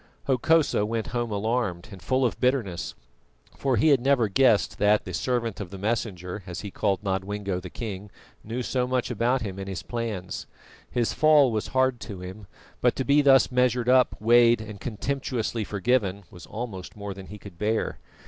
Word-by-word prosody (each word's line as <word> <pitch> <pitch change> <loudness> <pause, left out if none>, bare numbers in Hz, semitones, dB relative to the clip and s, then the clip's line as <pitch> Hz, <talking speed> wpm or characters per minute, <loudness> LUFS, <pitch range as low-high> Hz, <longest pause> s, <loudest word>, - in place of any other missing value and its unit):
Hokosa 140 -1 +3
went 110 +1 -2
home 120 -1 -1
alarmed 105 -3 -2
and 95 -3 -10
full 130 +10 +1
of 120 - -1
bitterness, 115 - -1 0.6
for 135 -3 0
he 155 - +4
had 140 -3 +5
never 130 -3 +3
guessed 120 0 +3
that 105 +1 +3
the 95 - -6
"servant 115 +3 -1
of 100 -4 -5
the 95 - -8
Messenger," 100 -3 -3
as 90 0 -5
he 100 - -7
called 100 +1 0
Nodwengo 95 0 -2
the 90 - -8
King, 105 -2 -6 0.3
knew 120 +4 -4
so 125 0 0
much 130 -1 -1
about 120 +3 +1
him 100 -2 -5
and 95 0 -5
his 95 -3 -5
plans. 115 -6 -4 0.4
His 120 -2 0
fall 150 -4 +5
was 110 -1 -2
hard 130 -2 +1
to 100 -5 -7
him, 95 +2 -9 0.3
but 125 - +3
to 130 - -2
be 140 +4 +5
thus 135 -2 +5
measured 125 -1 +2
up, 130 -1 +4
weighed, 120 +1 +5
and 105 -2 -8
contemptuously 120 -1 -2
forgiven 100 -1 0
was 90 - -12
almost 105 -5 -6
more 100 -1 -5
than 95 -1 -10
he 105 - -9
could 100 -4 -13
bear. 110 +1 -1
110 Hz, 185 wpm, -26 LUFS, 100-125 Hz, 0.6 s, had